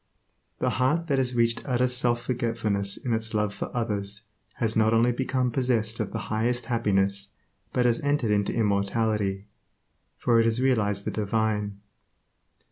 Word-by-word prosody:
The - - 0
heart 150 +6 +2
that 135 -2 +2
has 125 -1 -1
reached 115 0 +2
utter 125 -1 +2
self 125 -1 +1
forgetfulness 115 -5 0
in 120 - -2
its 110 0 -2
love 105 -1 0
for - - -5
others 105 -3 -2 0.3
has 115 -1 0
not 110 0 +3
only 120 +2 +4
become 130 0 -1
possessed 115 -3 0
of - - -2
the - - -3 0.2
highest 120 +3 0
happiness 100 -4 +1 0.4
but 125 - +1
has 120 -1 +3
entered 145 -6 +1
into 100 -1 +1
immortality, 100 -1 0 0.7
for 120 -2 +3
it 115 - +4
has 115 +1 +2
realized 105 -6 +1
the - - -1
Divine. 105 -1 -1
115 Hz, 155 wpm, -26 LUFS, 105-125 Hz, 0.7 s, only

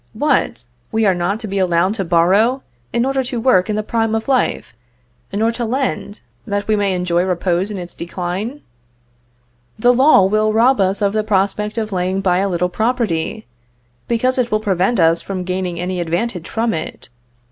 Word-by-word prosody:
What! 225 - 0 0.3
we 220 0 +1
are 195 - +4
not 180 +4 -1
to 220 - -5
be 195 0 -2
allowed 180 +1 +2
to 210 -3 -2
borrow, 190 +10 +2 0.3
in 235 +1 +1
order 270 0 0
to 245 -1 -3
work 220 -5 +3
in 210 - 0
the 215 - -1
prime 225 0 0
of 225 - -3
life, 260 - 0 0.6
nor 220 +3 +1
to 235 +1 -4
lend, 235 - -2 0.3
that 205 0 -2
we 215 - +3
may 200 -2 0
enjoy 180 -1 +1
repose 180 +1 0
in 210 - -5
its 175 -1 -7
decline? 185 +10 -5 1.2
The 245 +3 +4
law 260 -6 +5
will 215 +2 +1
rob 235 +1 +4
us 195 +2 +1
of 200 0 +1
the 215 0 0
prospect 210 +1 0
of 220 -1 -2
laying 185 0 -1
by 185 -2 +2
a 200 +1 0
little 180 0 0
property, 220 -2 -1 0.6
because 255 +3 +1
it 240 -1 +1
will 215 - +1
prevent 195 +2 0
us 165 0 +4
from 190 -2 -4
gaining 180 -1 -3
any 180 +1 -3
advantage 175 +2 -2
from 225 0 0
it. 160 -5 -6
200 Hz, 185 wpm, -18 LUFS, 180-225 Hz, 1.2 s, law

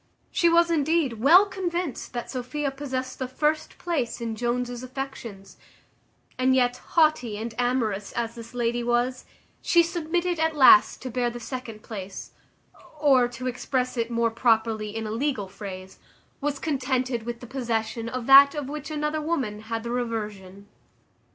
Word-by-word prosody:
She 345 -2 +3
was, 340 0 +4
indeed, 305 -6 +1
well 335 - +7
convinced 355 -6 -4
that 240 -1 -5
Sophia 270 +3 -3
possessed 260 -2 -5
the 260 - -2
first 300 +4 -1
place 295 -10 -2
in 230 -1 -3
Jones's 245 +1 -2
affections; 255 -6 -7 0.8
and 260 0 +3
yet, 245 -1 +2
haughty 305 -11 +1
and 225 +1 -5
amorous 230 -5 0
as 230 -1 -2
this 230 0 -11
lady 240 0 0
was, 240 +1 0 0.4
she 340 -1 +4
submitted 345 +1 -1
at 320 -1 +1
last 325 +4 +6
to 255 - -5
bear 245 0 0
the 240 0 -7
second 235 -3 -7
place; 195 -3 -7 0.7
or, 270 -5 +5
to 245 +1 -8
express 255 0 -2
it 230 -1 -1
more 235 -1 +1
properly 225 -2 +1
in 225 0 -3
a 215 - -4
legal 230 -3 -1
phrase, 190 -1 -9 0.4
was 285 0 -1
contented 260 -4 -1
with 235 +1 -6
the 245 - -10
possession 230 -2 -3
of 255 -1 -4
that 280 +2 +8
of 295 -3 -3
which 300 +1 -6
another 300 0 -2
woman 275 -10 -2
had 225 +1 -4
the 235 - -4
reversion. 210 -5 -4
250 Hz, 155 wpm, -25 LUFS, 230-290 Hz, 0.8 s, that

